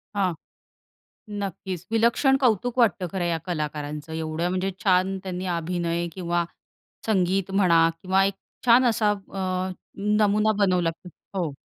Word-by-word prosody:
हां. 190 -3 +1 1.1
नक्कीच 190 -3 -5
विलक्षण 235 +4 +4
कौतुक 245 -2 +1
वाटतं, 205 -6 +3
खरं 185 -2 -1
या 170 -1 0
कलाकारांचं 150 -2 -4
एवढं 160 +1 -2
म्हणजे 185 +1 -1
छान 190 0 +3
त्यांनी 185 -1 -4
अभिनय 170 0 -1
किंवा 175 -1 -1 0.6
संगीत 190 -2 +1
म्हणा 170 -4 +4
किंवा 190 0 +3
एक 195 0 0 0.3
छान 245 +2 +7
असा 215 -1 +2
अ, 190 -2 -3 0.5
नमुना 210 +1 +3
बनवला 180 -3 +2
की 165 +2 -13 0.3
हो. 165 -6 -1
185 Hz, 130 wpm, -25 LUFS, 170-200 Hz, 1.1 s, छान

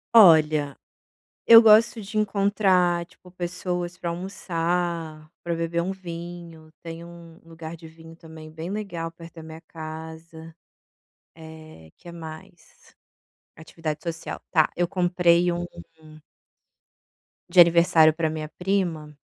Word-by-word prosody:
Olha, 155 -7 +6 0.7
eu 230 0 +10
gosto 225 +1 +5
de 215 +2 -8
encontrar, 195 -4 +1
tipo, 180 0 -20
pessoas 180 0 -4
para 170 - -4
almoçar, 170 -3 -3
pra 170 -1 -2
beber 165 +1 -2
um 185 - -3
vinho, 170 -3 -9
tem 165 0 -8
um 170 -1 -14
lugar 165 0 -9
de 160 0 -13
vinho 165 0 -15
também 160 -1 -12
bem 160 +3 -7
legal 185 -6 -5
perto 165 0 -14
da 165 - -10
minha 160 0 -11
casa. 160 0 -10 0.8
Eh, 155 - -13
que 175 - -13
mais? 170 +2 -13 0.6
Atividade 160 -1 -6
social, 165 -2 -6
tá. 155 -3 +3
Eu 175 - +1
comprei 175 -1 +2
um 175 0 -3 1.8
de 185 - +3
aniversário 170 -2 +5
pra 160 -1 -1
minha 155 -1 -5
prima 175 -6 -2
170 Hz, 120 wpm, -24 LUFS, 160-180 Hz, 1.8 s, eu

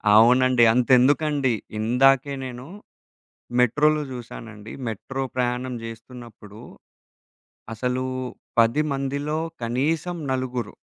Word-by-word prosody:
అవునండి. 125 +2 +5
అంతెందుకండి, 130 +2 +3 0.3
ఇందాకే 135 +5 +3
నేనూ 125 +1 -7 0.9
మెట్రోలో 150 +5 +3
జాశానండి. 115 -3 -9 0.2
మెట్రో 135 +5 -4
ప్రయాణం 125 0 -1
జేస్తున్నప్పుడు, 115 -2 -11 1.1
అసలూ 125 +3 -2 0.6
10 115 +6 +3
మందిలో 140 +3 -2 0.2
కనీసం 150 +9 -1 0.2
నలుగురు... 125 -4 -3
125 Hz, 75 wpm, -24 LUFS, 115-135 Hz, 1.1 s, అవునండి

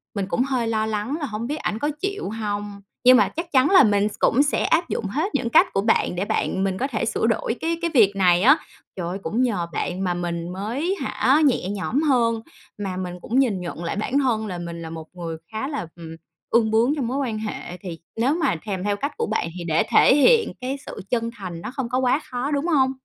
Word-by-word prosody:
mình 195 -1 -1
cũng 250 - +1
hơi 255 -4 -1
lo 220 -1 0
lắng 220 +6 -2
là 290 - -2
hổng 225 0 -4
biết 295 - -2
ảnh 220 -7 -3
có 295 - 0
chịu 400 - -3
hông, 205 -2 -4 0.2
nhưng 255 0 +8
mà 210 - +4
chắc 335 +2 -6
chắn 265 +2 +4
là 380 -6 +8
mình 205 -1 +3
s - - -11
cũng 275 +5 +4
sẽ 290 - 0
áp 335 +1 +2
dụng 215 - -2
hết 310 - -2
những 235 - 0
cách - - +6
của 195 - +2
bạn 220 -4 +1
để 190 +3 -1
bạn 190 -1 -1
mình 190 -1 -1
có 270 - -1
thể 230 -3 -2
sửa 225 0 0
đổi 230 +1 0
cái 330 +1 0
cái 335 -1 -1
việc 200 -6 +5
này 180 -2 +4
á. 275 +6 +7 0.4
Trời 175 -3 -4
ơi, 185 +3 -3
cũng 220 +10 -1
nhờ 200 -9 0
bạn 180 +4 -2
mà 180 -1 0
mình 170 -1 -3
mới 255 - -2
hả, 285 +4 +2
nhẹ 240 -8 +1
nhõm 210 +8 -1
hơn, 235 -6 +2 0.4
mà 190 -3 -4
mình 180 -1 -4
cũng 250 +4 0
nhìn 210 -9 +1
nhận 170 -1 -6
lại 170 - -2
bản 250 +7 0
thân 225 -5 0
là 180 -2 -4
mình 170 -1 -6
là 160 - -6
một 160 -1 -8
người 165 -2 -5
khá 220 +5 -3
là, 280 - -4
ừm, 165 -1 -9 0.3
ương 225 -2 +3
bướng 235 +7 +3
trong 260 -6 -2
mối 260 +3 -2
quan 235 -6 -2
hệ. 210 -4 -6
Thì 175 -4 -8 0.2
nếu 245 +6 +2
mà 330 - +1
thèm 195 -3 -3
theo 205 0 0
cách 280 +7 -3
của 460 - 0
bạn 165 - -1
thì 175 - -5
để 165 -1 +2
thể 260 - +6
hiện 455 - +4
cái 260 +2 -2
sự - - -7
chân 230 -2 0
thành 180 -5 -7
nó - - -6
không 260 -3 -4
có 250 - 0
quá 260 +2 +2
khó, 250 +4 -2
đúng 285 +2 0
hông? 265 -5 +3
225 Hz, 255 wpm, -23 LUFS, 190-270 Hz, 0.4 s, nhưng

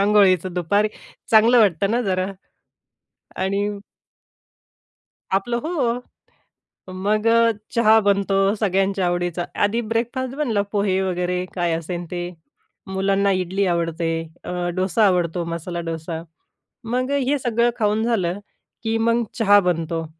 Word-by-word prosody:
अंघोळीचं, 195 -3 +4
दुपारी 200 +5 +1 0.4
चांगलं 230 +2 +6
वाटतं 200 -2 +3
ना 240 +2 +1
जरा. 185 -1 -1 1.1
आणि 200 +2 0 1.7
आपलं 235 +5 0
हो. 250 -6 -1 0.9
मग 210 +3 0 0.5
चहा 220 -1 +6
बनतो 200 -1 +2 0.2
सगळ्यांच्या 195 -1 +1
आवडीचा, 175 0 -1 0.2
आधी 225 +4 +1
ब्रेकफास्ट 240 +4 -2
बनला 240 -9 0
पोहे 200 -2 +1
वगैरे 180 -1 -1
काय 175 -2 0
असेल 170 +1 -4
ते, 175 0 -4 0.6
मुलांना 195 +1 +1
इडली 190 +1 0
आवडते 170 -1 -1 0.4
अ, - - -6 0.2
डोसा 185 +3 +2
आवडतो, 175 -2 +1
मसाला 170 +1 -4
डोसा. 160 0 -5 0.6
मग 250 +4 -1 0.2
हे 290 +1 +2
सगळं 240 -1 +1
खाऊन 215 0 +1
झालं 200 -5 0 0.4
की 225 0 0
मग, 230 +1 +2
चहा 205 -3 +5
बनतो 165 -1 -1
195 Hz, 115 wpm, -22 LUFS, 180-225 Hz, 1.7 s, चांगलं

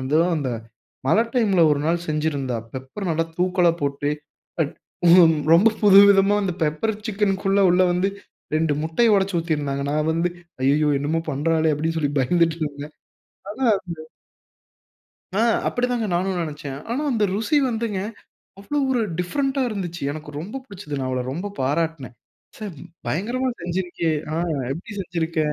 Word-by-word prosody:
அந்தோ, 140 +5 +2 0.2
அந்த 140 -4 -2 0.6
மழை 210 +11 +4
டைம் 225 -5 +2
ல 170 - +7
ஒரு 145 - 0
நாள் 170 +1 0
செஞ்சிருந்தா, 150 -5 -1 0.2
பெப்பர் 130 +10 -5
நல்லா 165 0 +1
தூக்கலா 180 -1 +3
போட்டு. 140 +1 -1 0.5
அ - - +6 0.9
ரொம்ப 190 +7 +6
புது 200 -2 +8
விதமா 200 0 +5
அந்த 190 -2 -1
பெப்பர் 155 +9 0 0.2
சிக்கனுக்குள்ளே 195 -1 +1
உள்ளே 180 +1 +4
வந்து 180 +2 +1 0.5
2 160 -1 +1
முட்டைய 210 +8 +2
ஒடச்சு 195 -1 0
ஊத்திருந்தாங்க. 145 -4 -1
நான் 150 +1 0
வந்து 165 +2 +1 0.3
ஐய்யயோ! 150 +3 +3
என்னமோ 150 +4 -1
பண்றாளே! 160 +3 +1
அப்பிடின்னு 160 +2 -1
சொல்லி 145 -2 0
பயந்துட்டு 165 +4 +2
இருந்தேன் 145 +1 -8 0.6
ஆனா, 250 +6 -3 0.2
அந்த 170 -3 -7 1.4
ஆ - - +4 0.3
அப்பிடி 245 0 0
தாங்க 240 -2 0
நானும் 185 +1 0
நினைச்சேன். 145 -3 -6
ஆனா, 255 +5 -1
அந்த 225 -4 +1
ருசி 225 +9 +1
வந்துங்க 225 -4 -2 0.6
அவ்ளோ 200 +9 -3
ஒரு 250 -2 +2 0.2
டிஃபரண்ட்டா 270 +9 0
இருந்துச்சு. 180 -6 -5
எனக்கு 150 0 -7
ரொம்ப 200 +11 -6
புடிச்சது. 185 - -6
நான் 130 - -2
அவள 130 -1 -1
ரொம்ப 175 +8 -4
பாராட்னேன். 145 -1 -1 0.4
ச்சே! 215 - -6 0.4
பயங்கரமா 240 - -1
செஞ்சிருக்கியே! 175 -2 -1 0.2
ஆ - - -1 0.4
எப்பிடி 170 +9 -8
செஞ்சிருக்க? 170 -2 -3
170 Hz, 145 wpm, -23 LUFS, 150-200 Hz, 1.4 s, புது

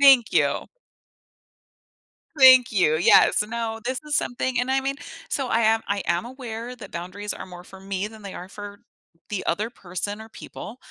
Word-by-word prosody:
Thank 270 -5 +7
you. - - +2 1.7
Thank 260 -2 +8
you, 175 -6 +3
yes. 175 +4 +5
No, 225 0 -4
this 255 +1 -2
is 300 - -2
something 250 0 -1
and 250 +1 -2
I 270 0 +2
mean 275 +1 -2 0.3
so 270 -3 -1
I 230 - +2
am 225 0 +3
I 200 -1 -1
am 170 +1 0
aware 245 -1 -7
that 205 -5 -11
boundaries 185 +5 -5
are - - -8
more 180 -1 -11
for 190 +1 -13
me 195 0 -3
than 215 0 -12
they 200 - -8
are 180 - -8
for 205 0 -9 0.5
the 200 -3 -3
other 210 +7 -1
person, 205 +1 -5
or 220 - -10
people, 225 +1 -10
220 Hz, 180 wpm, -24 LUFS, 195-245 Hz, 1.7 s, Thank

